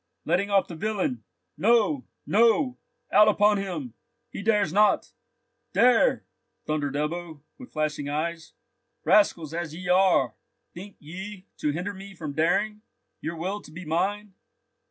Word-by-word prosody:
"Letting 180 +5 +1
off 200 -1 +3
the - - -8
villain! 170 - -2 0.4
No! 240 +6 +3 0.2
No! 235 +5 +3 0.3
Out 210 - +7
upon 210 0 +4
him! 200 +7 -5 0.4
He - - -6
dares 205 -5 +2
not!" 210 +1 +3 0.6
"Dare!" 250 - +4 0.4
thundered 145 -2 -2
Ebbo, 160 +1 -3 0.2
with 255 - -11
flashing 155 -2 -2
eyes. 160 +2 -3 0.5
"Rascals 170 -7 +3
as 165 -2 -4
ye 180 +1 -6
are, 180 - +4 0.4
think 195 +3 -10
ye 190 +5 -9
to 150 - -1
hinder 175 +7 -3
me 195 0 -11
from 155 -4 -6
daring? 205 +7 +1 0.4
Your 165 +2 -4
will 190 +5 -3
to - - -14
be 170 +3 -9
mine? 195 +6 -1
185 Hz, 135 wpm, -26 LUFS, 160-210 Hz, 0.6 s, Out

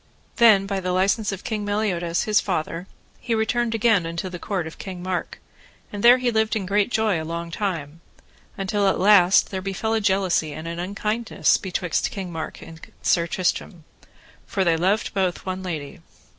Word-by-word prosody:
Then 215 -5 +6
by 195 -1 -2
the 180 -1 -2
license 200 +4 +1
of 195 -1 -6
King 215 -2 -3
Meliodas, 190 -5 -1
his 215 -1 +3
father, 175 -1 -3 0.3
he 235 -1 -1
returned 225 +1 0
again 215 -6 +3
unto 170 +3 -4
the 180 -1 -7
court 190 -3 -2
of 160 - -9
King 185 -2 -7
Mark, 185 -1 -3 0.5
and 205 - -4
there 240 +3 +8
he 250 -1 0
lived 220 -1 +1
in 205 -3 -2
great 200 +3 +1
joy 215 -8 +1
long 170 +1 -5
time, 165 -5 -4 0.6
until 200 +1 0
at - - +4
the - - -4
last 190 -2 +5
there 190 -1 -3
befell 195 +3 -2
a 225 - +1
jealousy 190 -6 +1
and 160 +2 -7
an 170 0 -5
unkindness 210 +5 0
betwixt 180 -2 -1
King 190 -3 -6
Mark 160 -1 -6
and 160 0 -12 0.2
Sir 170 -1 +2
Tristram, 175 -1 -2 0.6
for 195 - 0
they 170 -2 +3
loved 190 +6 0
both 185 -3 -1
one 185 0 -3
lady. 160 -5 -5
190 Hz, 185 wpm, -23 LUFS, 175-210 Hz, 0.6 s, there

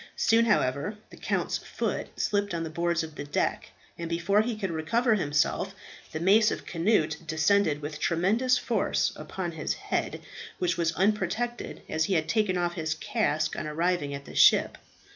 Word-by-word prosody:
Soon, 230 +1 +4
however, 200 - +1
the - - -11
count's - - -1
foot - - -3
slipped 205 -3 0
on 165 - -2
the 160 - -5
boards 170 +1 0
of 160 -1 -8
the 145 - -6
deck, 145 - -1 0.3
and 170 -1 -4
before 170 +5 +2
he 230 +1 -2
could 195 -4 -3
recover 220 +10 +1
himself 150 -7 0 0.4
the 155 - -4
mace 210 +6 +5
of - - -4
Cnut 165 -3 +1
descended 155 -1 +2
with 150 +1 -5
tremendous 220 +10 +2
force - - 0
upon - - -5
his - - -3
head, - - -2 0.4
which 180 -1 0
was 170 -1 +1
unprotected, 210 +5 -1
as 160 0 0
he 195 - 0
had 160 -1 +1
taken 210 -5 +1
off 175 -1 0
his 160 -3 -2
casque 155 -9 -1
on 155 - -4
arriving 165 -1 0
at 140 0 -6
the - - -11
ship. - - +5
175 Hz, 175 wpm, -28 LUFS, 155-210 Hz, 0.4 s, mace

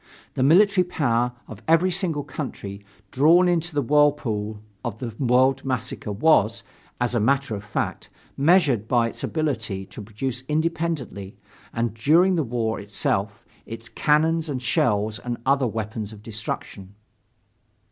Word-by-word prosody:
The - - -2
military 185 +7 +5
power 125 -8 0
of 110 -1 -10
every 165 +3 +4
single 170 -5 -1
country 100 -10 -7 0.3
drawn 165 +7 +5
into 170 -2 0
the 145 - +1
whirlpool 120 -7 +1 0.2
of 120 -4 -4
the 115 -1 -6
world 130 +1 +3
massacre 125 -4 -3
was, 155 +11 +3 0.4
as 120 0 0
a 120 - +2
matter 135 +2 +1
of 100 -1 -5
fact, 105 - -4 0.3
measured 140 - +3
by 120 -1 +2
its - - -8
ability 115 -11 -2
to 95 +3 -10
produce 115 +5 -4
independently 155 - -2 0.3
and 115 -2 -1
during 160 +11 +4
the 170 - +1
war 115 -4 -2
itself, 100 0 -2 0.2
its 115 +1 -8
cannons 160 +2 +1
and 130 -3 -3
shells 105 -2 +1
and 120 +2 -4
the - - -20
other 135 -1 +3
weapons 110 -1 -4
of 105 -1 -13
destruction. 105 -3 -6
125 Hz, 145 wpm, -24 LUFS, 110-150 Hz, 0.4 s, military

